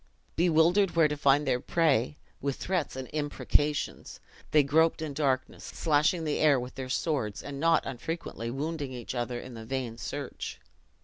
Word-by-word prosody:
Bewildered 175 +3 +3
where 165 -2 +6
to 150 - -2
find 145 0 +3
their 125 - +2
prey, 145 -3 +1 0.2
with 140 -1 -1
threats 180 -8 -2
and 130 -1 -5
imprecations, 145 0 -1 0.3
they 150 -1 +5
groped 160 +4 +3
in 155 -2 -4
darkness, 135 -3 -1
slashing 155 +2 +1
the 150 -2 -1
air 145 -4 +5
with 125 +1 -6
their 130 -1 -6
swords, 130 -7 -1
and 140 -1 -6
not 165 +2 +3
unfrequently 130 -3 -5
wounding 145 +1 -3
each 120 0 -6
other 120 -1 -2
in 130 - -9
the 115 -1 -8
vain 120 -1 -4
search. 140 +3 -5
145 Hz, 165 wpm, -29 LUFS, 130-160 Hz, 0.3 s, where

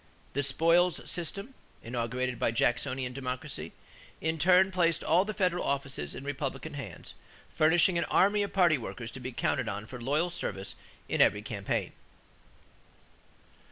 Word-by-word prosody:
The 140 - +1
spoils 165 +5 +3
system, 200 - -4 0.3
inaugurated 120 +1 -2
by - - +2
Jacksonian 125 +2 0
Democracy, 125 -1 -5 0.5
in 160 0 -1
turn 185 +3 +5
placed 170 -3 +2
all 180 +4 +4
the 215 - -3
federal 180 -2 +1
offices 135 - -2
in - - -7
Republican 140 -1 -4
hands, 125 - -8 0.4
furnishing 170 +3 +4
an - - 0
army 205 +2 +3
of 200 - -2
party 175 -7 +4
workers 115 +1 -6
to 135 - -8
be 130 +1 -5
counted 120 0 0
on 105 0 -4
for 125 +2 -9
loyal 150 +8 +1
service 100 - -4 0.3
in - - +1
every 105 0 +4
campaign. 100 -3 -2
140 Hz, 145 wpm, -30 LUFS, 125-175 Hz, 0.5 s, turn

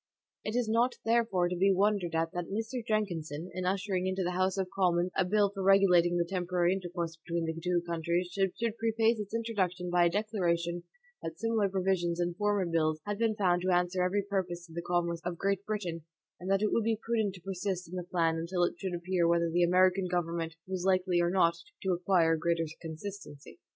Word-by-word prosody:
It 215 - -3
is 245 -2 +1
not, 235 +3 +2
therefore, 225 -6 +2
to 180 - -2
be 195 +3 +3
wondered 195 -3 +1
at 165 0 0
that 175 -1 -3
Mr. 225 +4 -3
Jenkinson, 175 -7 -2
in 185 0 -3
ushering 185 0 0
into 190 0 -1
the 180 - -1
House 185 +2 0
of 190 -1 0
Commons 180 -2 +2
a 190 - +3
bill 200 +2 +2
for 195 -1 -5
regulating 180 -3 +5
the 170 - +1
temporary 180 -1 +1
intercourse 175 -3 -4
between 170 -1 -2
the 160 - -2
two 180 -1 +1
countries, 170 +1 -1
should 195 0 0 0.2
preface 225 0 +2
its 210 +1 -5
introduction 190 -6 -1
by 175 0 +4
a - - +4
declaration 175 -4 -1 0.4
that 165 0 -6
similar 225 -2 +1
provisions 185 -2 0
in 175 0 0
former 205 0 +1
bills 155 -2 +1
had 205 0 -3
been 225 -2 +2
found 180 -4 +2
to 185 - -1
answer 180 0 +2
every 190 +3 +1
purpose 185 -3 -3
to 165 - -15
the 170 - -3
commerce 170 -1 -1
of 175 -1 -3
Great 195 +1 0
Britain, 185 -6 -3 0.4
and 180 - -6
that 195 +1 +2
it 215 - +2
would 230 - +2
be 225 0 +1
prudent 220 -4 -1
to 180 - -12
persist 190 -1 -3
in 175 - -8
the 180 - -2
plan 165 -2 0
until 175 +2 -1
it 175 - +1
should 185 -2 -3
appear 175 0 0
whether 170 0 +2
the 175 +2 +2
American 185 +2 +4
government 170 -2 -2
was 185 -1 -3
likely 185 -2 +2
or 175 - +2
not 175 -2 +3 0.3
to 190 - +1
acquire 175 -2 +3
greater 165 +1 0 0.2
consistency. 165 -2 -8
180 Hz, 205 wpm, -30 LUFS, 170-195 Hz, 0.4 s, regulating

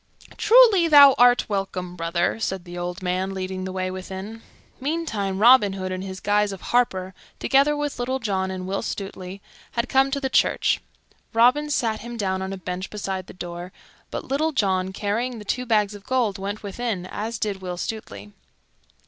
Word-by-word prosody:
"Truly, 445 -7 +6
thou 285 -3 +9
art 245 0 +5
welcome, 190 -3 -3
brother," 170 +4 -1
said 190 -4 -3
the 175 0 -9
old 175 +1 -5
man, 185 +2 -1
leading 185 0 -4
the 190 - -4
way 185 0 -2
within. 190 +4 -7 0.4
Meantime, 255 - -2
Robin 215 -2 +6
Hood, 185 -1 -4
in 185 0 -3
his 190 0 -6
guise 205 0 +1
of 195 - -8
harper, 190 -6 0 0.2
together 280 +2 +3
with 295 -2 -3
Little 255 +2 -1
John 195 -6 -1
and 185 -1 -5
Will 195 +1 -2
Stutely, 195 -2 -6 0.3
had 235 +1 -1
come 270 +1 +3
to 280 - -1
the 270 - -1
church. - - +2 0.5
Robin 250 +6 +4
sat 225 -6 0
him 240 +1 -7
down 190 -3 -1
on 190 0 -4
a 195 - -4
bench 180 +1 -5
beside 190 -3 -4
the - - -11
door, 175 0 -7 0.4
but - - -5
Little 310 +4 0
John, 190 -6 +1
carrying 225 +5 -2
the 210 - -10
two 250 +5 -2
bags 210 -2 +2
of 205 -1 -11
gold, 230 -5 0
went 200 +2 -5
within, 205 -2 -3
as 215 +4 -4
did 205 -3 -3
Will 180 -1 -5
Stutely. 105 - -6
200 Hz, 180 wpm, -24 LUFS, 185-245 Hz, 0.5 s, thou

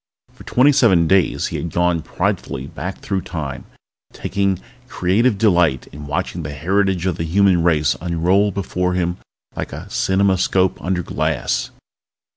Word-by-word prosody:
For - - -14
twenty 130 +4 +4
seven 110 -12 +4
days 95 +1 +2
he - - -4
had 85 - -4
gone 85 0 +1
pridefully 65 -3 -2
back 80 +5 -6
through 95 -2 -2
Time, 75 -8 -6 0.5
taking 100 -2 -1 0.3
creative 105 +5 +1
delight 90 - +2
in 75 0 -9
watching 70 - -3
the 70 - -5
heritage 95 +3 0
of 90 -3 0
the 80 - -2
human 90 +1 +3
race 75 -5 +2
unroll 90 +4 +2
before 90 -1 -2
him 85 0 -1 0.4
like - - -4
a - - -7
cineramoscope 95 -1 +1
under 90 -1 -1
glass. - - -1
90 Hz, 145 wpm, -20 LUFS, 85-95 Hz, 0.5 s, twenty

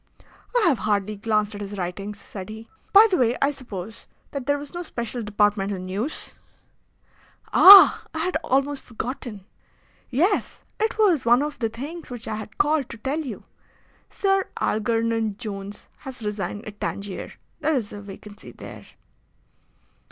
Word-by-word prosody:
"I - - +4
have 280 -8 +3
hardly 210 0 0
glanced 215 0 0
at 205 - -7
his 205 0 -6
writings," 195 +3 -5
said 195 -1 -9
he. 220 +1 -9 0.2
"By 410 +2 +9
the 365 - +3
way, 245 0 +2
I 280 - +2
suppose 225 -6 -9 0.2
that 275 -2 -5
there 285 0 +2
was 285 0 -9
no 350 - -4
special 240 -7 -5
departmental 205 -2 +1
news?" 195 +10 -4 1.2
"Ah! 390 +1 +10
I - - -7
had 355 +2 -1
almost 275 +1 0
forgotten. 235 -4 -6 0.6
Yes, 345 - 0 0.2
it 440 +2 0
was 380 - +3
one 240 +4 +4
of 295 -1 -5
the 225 -3 0
things 290 +9 -8
which 245 -2 -6
I 215 - -3
had 215 -1 -9
called 295 -2 +1
to - - -8
tell 270 +7 -2
you. 260 -10 -6 0.7
Sir 390 -1 +1
Algernon 225 -1 0
Jones 205 -3 -7
has 260 -4 -8
resigned 205 -1 -4
at 210 -1 -10
Tangier. 200 -1 -5 0.3
There 310 -1 +1
is 225 -6 -3
a 205 - -7
vacancy 205 +1 -11
there." - - -11
230 Hz, 155 wpm, -24 LUFS, 205-285 Hz, 1.2 s, Ah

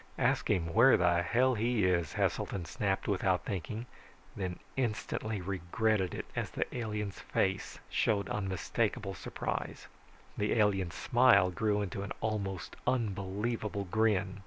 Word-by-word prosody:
"Ask - - +1
him 80 -2 +1
where 120 +6 +7
the 85 -1 +3
hell 125 +8 +3
he 115 -2 +1
is," 85 -4 +1
Heselton 95 -4 -1
snapped 95 +2 -1
without 95 -4 +1
thinking, 105 +4 -4 0.5
then 90 -3 -3 0.2
instantly 110 -4 -2
regretted 95 +1 0
it - - -4
as - - -1
the - - -1
alien's 105 -4 -3
face - - -1
showed 100 -3 +1
unmistakable 95 -3 -1
surprise. - - -4 0.5
The 105 0 +1
alien's 95 -6 +2
smile 120 -8 +5
grew 105 +3 +1
into 100 0 -4
an 100 - -4
almost 100 -4 -3
unbelievable 105 -1 -1
grin. 105 -3 +1
100 Hz, 130 wpm, -32 LUFS, 95-110 Hz, 0.5 s, where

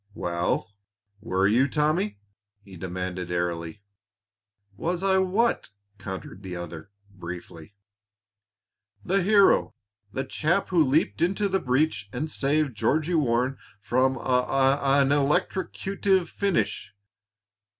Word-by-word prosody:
"Well, 85 +3 -2 0.5
were 95 -3 +1
you, 120 +6 +3
Tommy!" 150 -9 0 0.5
he 95 -1 -13
demanded 90 0 -5
airily. 85 +2 -3 0.9
"Was 175 - -2
I 190 -1 +3
what?" 200 +6 +1 0.3
countered 95 0 -7
the 95 -2 -6
other, 85 -1 -7 0.2
briefly. 85 -1 -9 1.3
"The 195 +2 +2
hero 200 +1 +4 0.4
the 135 - -2
chap 170 +7 0
who 175 -4 +4
leaped 150 +3 +1
into 195 +4 +1
the 190 0 +1
breach 125 - 0
and 150 +7 -4
saved 145 -2 0
Georgie 155 +10 +1
Warren 130 -3 +1 0.2
from 130 +5 +1
a - - -7
a 135 +2 +2
an 135 - +1
electrocutive 190 +6 0
finish." 105 - -1
130 Hz, 110 wpm, -26 LUFS, -, 1.3 s, hero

